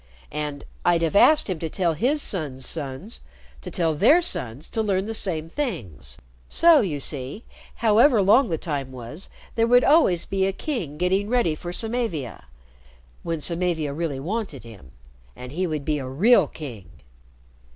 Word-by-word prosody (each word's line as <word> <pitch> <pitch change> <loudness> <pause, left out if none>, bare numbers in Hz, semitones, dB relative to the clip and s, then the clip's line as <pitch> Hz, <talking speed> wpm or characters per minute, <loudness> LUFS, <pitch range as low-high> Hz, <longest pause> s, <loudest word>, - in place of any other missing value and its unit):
And 150 -1 -4 0.2
I'd 170 -1 +3
have 165 +3 0
asked 305 +9 +5
him 185 -5 -3
to 160 - -3
tell 170 0 0
his 275 - +1
son's 140 -8 -2
sons 150 - -5 0.4
to - - -7
tell 165 -2 0
their 235 - +5
sons 140 - -4
to 225 - -1
learn 195 -3 0
the 225 - -4
same 165 -7 -2
things. 165 - -5 0.3
So, 330 -4 +6
you 160 -9 -2
see, 140 - -6 0.3
however 230 +3 +4
long 230 +6 +5
the 165 - -1
time 140 -5 -4
was, 130 +8 -8 0.2
there 230 0 +2
would 245 +1 +5
always 280 - +4
be 195 -1 0
a 195 - -1
king 190 - -4
getting 190 +4 0
ready 240 -10 +2
for 175 +3 -7
Samavia 220 - -3 0.8
when 165 -2 -3
Samavia 170 -3 -1
really 150 -3 -3
wanted 180 - -4
him. 100 - -13 0.5
And 125 0 -9
he 180 +5 -1
would 155 -3 -4
be 150 -1 0
a 130 - -5
real 190 - +4
king." 115 - -9
170 Hz, 165 wpm, -24 LUFS, 145-220 Hz, 0.8 s, So